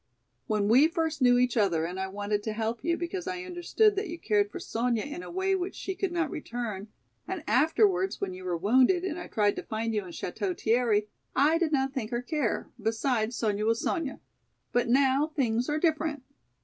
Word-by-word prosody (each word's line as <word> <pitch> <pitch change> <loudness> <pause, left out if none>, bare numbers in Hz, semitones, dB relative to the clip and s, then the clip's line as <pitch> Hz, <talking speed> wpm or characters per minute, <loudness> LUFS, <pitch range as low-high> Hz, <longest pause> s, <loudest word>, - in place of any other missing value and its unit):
When 210 -1 +1
we 255 +8 +6
first 320 -3 -2
knew 245 -1 +6
each 250 -1 +2
other 180 -8 +2
and 180 +3 -5
I 190 - -1
wanted 205 +1 -2
to 220 0 -3
help 225 +1 -3
you 335 0 +1
because 350 +2 -4
I 365 -1 -3
understood 365 +4 +2
that 400 0 -1
you 340 +1 -6
cared 205 -7 +1
for - - -7
Sonya 230 -1 -1
in 295 +4 -6
a - - -9
way 380 +2 0
which 375 0 -2
she 385 - -4
could 380 -1 -2
not 335 -3 -1
return, 230 -8 -5 0.4
and 375 -4 -4
afterwards 205 - +3
when 195 -2 -3
you 185 0 -9
were 180 -2 -1
wounded 255 - +4
and 355 -3 -3
I - - -7
tried 205 -2 +1
to - - -2
find 225 +1 -3
you 210 - +1
in - - -9
Château 355 - -4
Thierry, 220 -2 +2 0.3
I 305 +5 +4
did 335 -3 +1
not 270 -2 +1
think 245 -4 -4
or 240 0 -2
care, 290 -5 -2
besides 225 +1 0
Sonya 210 -2 0
was 230 0 +2
Sonya! 305 -5 -2 0.5
But 245 -1 +1
now 270 +3 +4
things 250 -6 0
are 300 - +1
different." 310 -3 0
250 Hz, 210 wpm, -28 LUFS, 215-325 Hz, 0.5 s, we